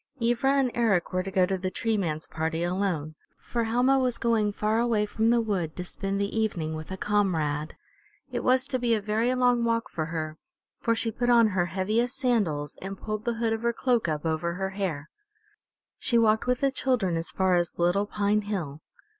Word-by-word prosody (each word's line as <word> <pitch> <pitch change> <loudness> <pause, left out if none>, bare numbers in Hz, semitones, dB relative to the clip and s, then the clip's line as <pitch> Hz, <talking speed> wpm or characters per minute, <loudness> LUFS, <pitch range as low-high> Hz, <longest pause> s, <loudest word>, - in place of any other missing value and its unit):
Ivra 240 +3 +2
and 265 -3 +2
Eric 205 -7 +1
were 185 - +1
to 190 - -5
go 185 -1 +3
to 190 0 -2
the 185 0 -2
Tree 225 +4 -1
Man's 160 -6 -2
party 160 +1 -2
alone, 175 -4 -1 0.2
for 235 -1 -2
Helma 250 +4 +3
was 250 -2 0
going 220 -3 +1
far 215 +2 0
away 230 -3 +2
from 220 +2 0
the 235 0 +4
wood 190 -8 -2
to 180 - -4
spend 195 +2 -3
the 200 +1 -2
evening 185 -8 -1
with 155 0 -7
a 190 - -5
comrade. 160 -8 0 0.6
It 245 - -3
was 255 0 +3
to 255 - -1
be 235 -2 +2
a - - 0
very 215 +4 0
long 245 -1 +3
walk 230 0 0
for 155 - -2
her, 155 -1 -4 0.4
for 230 - +1
she 225 0 0
put 245 +3 -1
on 235 -2 +6
her 180 -3 0
heaviest 215 +7 0
sandals 185 - 0
and 195 +1 -6
pulled 215 +1 -5
the 235 -1 0
hood 225 -1 0
of 225 - -3
her 235 0 +1
cloak 240 -5 +1
up 155 0 -2
over 165 +2 -1
her 190 +1 -3
hair. 180 -7 -3 0.9
She 235 - +2
walked 220 0 +3
with 250 0 +1
the 275 -1 +3
children 245 -10 0
as 165 0 -2
far 190 -1 +1
as 175 -1 0
Little 175 +4 +2
Pine 210 0 +1
Hill. 175 -8 -4
205 Hz, 210 wpm, -27 LUFS, 175-235 Hz, 0.9 s, on